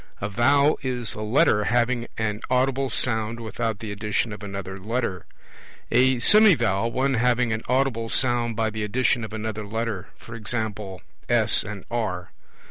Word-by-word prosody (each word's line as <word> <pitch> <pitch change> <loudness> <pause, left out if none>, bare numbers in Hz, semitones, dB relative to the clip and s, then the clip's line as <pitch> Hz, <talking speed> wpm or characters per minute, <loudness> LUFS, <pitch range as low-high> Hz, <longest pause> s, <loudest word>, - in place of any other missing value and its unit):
A 100 - -2
vowel 140 +8 +3
is 125 -4 -3
a 105 - -7
Letter 105 -1 +2
having 120 0 +1
an 105 -1 -2
audible 130 +1 +1
sound 110 -2 0
without 115 -1 -3
the 105 0 -7
addition 105 +2 -2
of 105 - -9
another 95 -1 -6
Letter. 105 -3 -3 0.6
A 130 +2 +4
semivowel, 120 - +4
one 135 +2 0
having 125 -1 +1
an 110 - -3
audible 125 -3 0
sound 120 -2 +2
by 110 -1 0
the 110 0 -4
addition 120 +2 0
of 110 - -6
another 110 -1 -4
Letter; 110 -2 -4 0.2
e.g. 115 0 -4 0.7
S - - +4
and 100 -2 -7
R. 100 -7 -3
115 Hz, 150 wpm, -24 LUFS, 105-125 Hz, 0.7 s, A